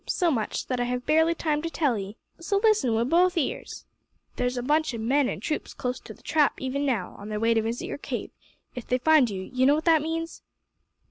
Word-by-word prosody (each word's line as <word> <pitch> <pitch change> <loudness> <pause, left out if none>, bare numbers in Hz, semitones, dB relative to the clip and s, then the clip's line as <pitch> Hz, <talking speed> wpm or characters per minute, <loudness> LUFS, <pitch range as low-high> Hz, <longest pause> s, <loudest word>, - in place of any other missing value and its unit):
So 350 -3 +1
much, 225 -6 -2
that 255 -2 -2
I 245 - +1
have 250 0 -3
barely 320 +2 +3
time 300 -3 -1
to 330 - -3
tell 295 -7 +1
'ee. 200 +1 -6 0.2
So, 395 +4 0
listen 410 - +3
wi' 225 - +2
both 350 +7 +3
ears. 295 - -3 0.5
There's 250 0 -1
a 245 - -2
bunch 300 -1 +1
o' - - -4
men 255 +4 +1
an' - - -5
troops 305 - -3
close 250 -1 -3
to - - -11
the - - -23
Trap 300 -2 +2
even 275 +2 -2
now, 225 -9 -2
on 205 +1 -8
their 210 0 -3
way 230 +1 +3
to 225 - +2
visit 230 +2 -3
your - - -5
cave. - - -5 0.4
If 245 -3 -8
they 250 - +2
find 290 -1 +4
you 190 -2 -5
you 255 +5 +1
know 285 - +5
what 310 - -3
that 325 -3 +5
means?" 330 +1 -4
265 Hz, 240 wpm, -26 LUFS, 240-315 Hz, 0.5 s, know